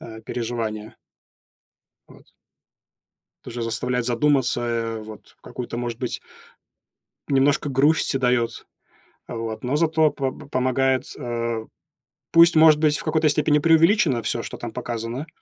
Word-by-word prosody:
э, 110 Hz, -1 st, -10 dB
переживание. 115 Hz, -3 st, -4 dB, 1.1 s
Вот. -, -, -18 dB, 1.2 s
Тоже 120 Hz, 0 st, -6 dB
заставляет 125 Hz, +2 st, -2 dB
задуматься, 130 Hz, 0 st, +1 dB
э, 115 Hz, -2 st, -2 dB
вот, 110 Hz, 0 st, -13 dB
какую-то, 120 Hz, -1 st, -7 dB
может 120 Hz, -1 st, -4 dB
быть 125 Hz, -, -4 dB, 1.1 s
немножко 140 Hz, +1 st, +2 dB
грусти 140 Hz, +2 st, +2 dB
даёт. 125 Hz, -2 st, 0 dB, 0.6 s
Вот, 115 Hz, 0 st, -5 dB
но 125 Hz, +3 st, -1 dB
зато 160 Hz, -1 st, +3 dB
по 135 Hz, -2 st, -2 dB
п 145 Hz, +2 st, -12 dB
помогает, 130 Hz, 0 st, +1 dB
э, 115 Hz, -3 st, -3 dB, 0.7 s
пусть, 165 Hz, 0 st, +6 dB
может 155 Hz, -1 st, +6 dB
быть, 150 Hz, -1 st, +3 dB
в -, -, -8 dB
какой-то 160 Hz, -1 st, +2 dB
степени 150 Hz, 0 st, +2 dB
преувеличено 165 Hz, -, +3 dB
всё, 115 Hz, -, -2 dB
что -, -, -7 dB
там 120 Hz, -, -6 dB
показано, 120 Hz, +3 st, -5 dB
125 Hz, 125 wpm, -23 LUFS, 115-150 Hz, 1.2 s, пусть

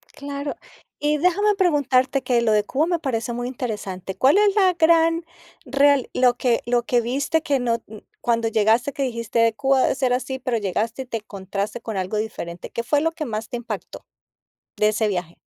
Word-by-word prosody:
Claro. 280 Hz, 0 st, -5 dB, 0.4 s
Y 300 Hz, +1 st, +1 dB
déjame 395 Hz, +6 st, +2 dB
preguntarte, 275 Hz, -6 st, +2 dB
que 240 Hz, -2 st, +2 dB
lo 220 Hz, -2 st, +2 dB
de 210 Hz, -1 st, +3 dB
Cuba 285 Hz, +8 st, 0 dB
me 345 Hz, -2 st, 0 dB
parece 240 Hz, -5 st, -2 dB
muy 245 Hz, +1 st, -3 dB
interesante: 200 Hz, -7 st, -5 dB
¿cuál 275 Hz, +9 st, +5 dB
es 415 Hz, -1 st, +4 dB
la 380 Hz, -3 st, +5 dB
gran 330 Hz, 0 st, +3 dB, 0.4 s
real 275 Hz, 0 st, +3 dB
lo 250 Hz, -1 st, +3 dB
que 245 Hz, -2 st, +1 dB
lo 240 Hz, 0 st, +1 dB
que 240 Hz, 0 st, +1 dB
viste 275 Hz, +7 st, 0 dB
que 280 Hz, -2 st, +1 dB
no 235 Hz, -1 st, -1 dB, 0.4 s
cuando 230 Hz, -1 st, +1 dB
llegaste 225 Hz, +5 st, +2 dB
que 280 Hz, -, -2 dB
dijiste: 230 Hz, -2 st, +1 dB
"Cuba 270 Hz, -1 st, +3 dB
debe -, -, +2 dB
ser 255 Hz, -2 st, +1 dB
así", 260 Hz, +1 st, -2 dB
pero 250 Hz, -2 st, -1 dB
llegaste 220 Hz, +5 st, -2 dB
y -, -, -6 dB
te 230 Hz, -2 st, -3 dB
encontraste 200 Hz, +2 st, -5 dB
con 220 Hz, -4 st, -5 dB
algo 185 Hz, +3 st, -2 dB
diferente? 175 Hz, -5 st, -5 dB
¿Qué 235 Hz, -, -3 dB
fue 290 Hz, +4 st, +1 dB
lo 325 Hz, -, +1 dB
que 325 Hz, -2 st, -5 dB
más 220 Hz, -2 st, -4 dB
te 245 Hz, -, -3 dB
impactó 235 Hz, -, -7 dB, 0.7 s
de 210 Hz, -, +3 dB
ese 215 Hz, 0 st, 0 dB
viaje? 180 Hz, -4 st, -3 dB
245 Hz, 195 wpm, -22 LUFS, 225-285 Hz, 0.7 s, cuál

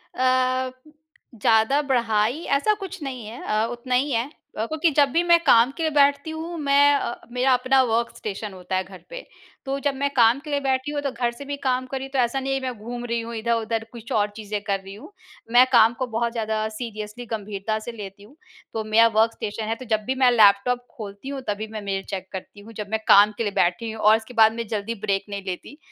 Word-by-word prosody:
अ, 255 Hz, 0 st, +1 dB, 0.6 s
ज़्यादा 225 Hz, +6 st, +3 dB
बढ़ाई, 235 Hz, 0 st, 0 dB
ऐसा 280 Hz, +10 st, +2 dB
कुछ 390 Hz, -3 st, -8 dB
नहीं 255 Hz, -5 st, -6 dB
है 230 Hz, +3 st, -9 dB
अ, 215 Hz, +1 st, +1 dB
उतना 245 Hz, +1 st, -2 dB
ही 275 Hz, +3 st, +1 dB
है। 230 Hz, -1 st, +1 dB, 0.3 s
अ, 220 Hz, -, 0 dB
क्योंकि 315 Hz, +5 st, +1 dB
जब 285 Hz, -1 st, +5 dB
भी 335 Hz, +5 st, +3 dB
मैं 340 Hz, -1 st, +5 dB
काम 250 Hz, -3 st, +5 dB
के 330 Hz, -, -2 dB
लिए 315 Hz, -, +1 dB
बैठती 285 Hz, +1 st, +3 dB
हूँ, 325 Hz, +2 st, -6 dB
मैं 285 Hz, 0 st, +4 dB
अ, 240 Hz, -, -2 dB, 0.2 s
मेरा 255 Hz, +2 st, +2 dB
अपना 255 Hz, +1 st, +3 dB
वर्क़ 235 Hz, -1 st, 0 dB
स्टेशन 205 Hz, -1 st, -5 dB
होता 185 Hz, 0 st, -5 dB
है 185 Hz, -, +1 dB
घर 190 Hz, 0 st, -14 dB
पे। -, -, -8 dB, 0.4 s
तो 275 Hz, +1 st, -2 dB
जब 285 Hz, -, +2 dB
मैं 280 Hz, +1 st, 0 dB
काम 235 Hz, +1 st, +5 dB
के 300 Hz, +2 st, -11 dB
लिए 285 Hz, -1 st, 0 dB
बैठी 265 Hz, 0 st, -1 dB
हूँ, 290 Hz, -1 st, -2 dB
तो 275 Hz, -2 st, -2 dB
घर 240 Hz, 0 st, -1 dB
से 235 Hz, +4 st, -10 dB
भी 285 Hz, +1 st, -3 dB
काम 255 Hz, -1 st, 0 dB
कर 270 Hz, -, -4 dB
रही 265 Hz, -, -5 dB
हूँ, 270 Hz, -, -20 dB
तो 270 Hz, -, 0 dB
ऐसा 245 Hz, +2 st, +1 dB
नहीं 270 Hz, 0 st, -2 dB
है, 270 Hz, -, 0 dB
मैं 255 Hz, -1 st, -3 dB
घूम 240 Hz, +3 st, -6 dB
रही 235 Hz, -1 st, -1 dB
हूँ 230 Hz, +1 st, -7 dB
इधर-उधर, 225 Hz, 0 st, -1 dB
कुछ 235 Hz, -1 st, -11 dB
और 210 Hz, -1 st, +2 dB
चीज़ें 210 Hz, -1 st, -4 dB
कर 200 Hz, -2 st, -1 dB
रही 195 Hz, 0 st, -11 dB
हूँ। 225 Hz, -, -12 dB, 0.4 s
मैं 245 Hz, +2 st, +7 dB
काम 230 Hz, -2 st, +6 dB
को 255 Hz, -, -1 dB
बहुत 235 Hz, 0 st, -1 dB
ज़्यादा 220 Hz, -2 st, -1 dB
सीरियसली, 215 Hz, 0 st, -7 dB
गँभीरता 215 Hz, -1 st, -3 dB
से 230 Hz, +2 st, -7 dB
लेती 200 Hz, -3 st, -9 dB
हूँ। 230 Hz, +8 st, -17 dB, 0.4 s
तो 220 Hz, -, -2 dB
मेरा 220 Hz, +2 st, +5 dB
वर्क़ 225 Hz, +1 st, +4 dB
स्टेशन 215 Hz, +1 st, -5 dB
है, 225 Hz, -, -1 dB
तो 255 Hz, -, -10 dB
जब 220 Hz, -2 st, 0 dB
भी 260 Hz, -, -1 dB
मैं 250 Hz, -, +6 dB
लैपटॉप 230 Hz, +2 st, +4 dB
खोलती 205 Hz, +3 st, -8 dB
हूँ, 275 Hz, -1 st, -5 dB
तभी 210 Hz, +1 st, -2 dB
मैं 215 Hz, -1 st, -5 dB
मेल 195 Hz, -1 st, -3 dB
चेक 190 Hz, -1 st, -5 dB
करती 190 Hz, +2 st, -8 dB
हूँ, 220 Hz, +3 st, -13 dB
जब 210 Hz, -2 st, -6 dB
मैं 220 Hz, -, +1 dB
काम 205 Hz, +1 st, +7 dB
के -, -, -1 dB
लिए 205 Hz, -, -1 dB
बैठी 185 Hz, +6 st, +1 dB
हूँ 220 Hz, 0 st, -7 dB
और 215 Hz, +1 st, +7 dB
उसके 225 Hz, +2 st, -11 dB
बाद 220 Hz, -1 st, +5 dB
मैं 230 Hz, 0 st, -5 dB
जल्दी 215 Hz, +2 st, -3 dB
ब्रेक 195 Hz, 0 st, 0 dB
नहीं 200 Hz, -1 st, -5 dB
लेती 190 Hz, +9 st, -6 dB
235 Hz, 245 wpm, -23 LUFS, 215-265 Hz, 0.6 s, मैं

